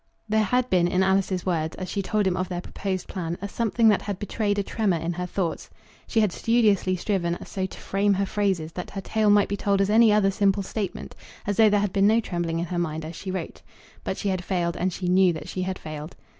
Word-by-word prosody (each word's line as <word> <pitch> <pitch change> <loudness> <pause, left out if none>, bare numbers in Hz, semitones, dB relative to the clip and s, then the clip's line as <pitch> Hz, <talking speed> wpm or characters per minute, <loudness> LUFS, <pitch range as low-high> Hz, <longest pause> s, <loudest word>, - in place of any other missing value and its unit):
There 215 0 +2
had 250 +2 +1
been 175 -2 +4
in 180 +2 +2
Alice's 190 -1 +1
words, 160 -3 -1
as 185 - -5
she 200 - -2
told 210 +1 0
him 185 -2 +1
of 185 0 -2
their 175 -1 -3
proposed 185 0 -4
plan, 170 -2 -4
a 200 - -4
something 230 +2 +1
that 205 - +3
had 200 -2 -4
betrayed 205 +1 -1
a 200 - +1
tremor 200 -4 0
in 165 +2 -2
her 180 +1 -4
thoughts. 180 -2 -3 0.4
She 225 - +2
had 210 -3 +2
studiously 210 -4 +2
striven 175 -2 -1
so 190 -1 -3
to - - -12
frame 200 +1 +1
her 200 +1 0
phrases 190 -5 -1
that 180 +2 -6
her 195 - -5
tale 215 +2 +1
might 205 0 +5
be 200 - -2
told 200 0 +1
as 195 +1 +2
any 225 0 +6
other 205 -2 +3
simple 200 0 +2
statement, 195 -1 -5 0.3
as 205 -1 -1
though 220 -1 +6
there 205 0 +3
had 205 -2 -1
been 200 0 +4
no 220 +2 +4
trembling 175 -6 -2
in 170 - -1
her 175 0 -3
mind 160 -2 -2
as 160 +1 -7
she 190 - -7
wrote. 185 0 -5 0.4
But - - -3
she 205 - -2
had 185 -1 -1
failed, 175 -2 -1
and 185 +1 0
she 180 +1 -4
knew 185 0 +4
that 160 - -7
she 185 - -4
had 185 0 -2
failed. 155 +1 -8
190 Hz, 250 wpm, -25 LUFS, 180-205 Hz, 0.4 s, any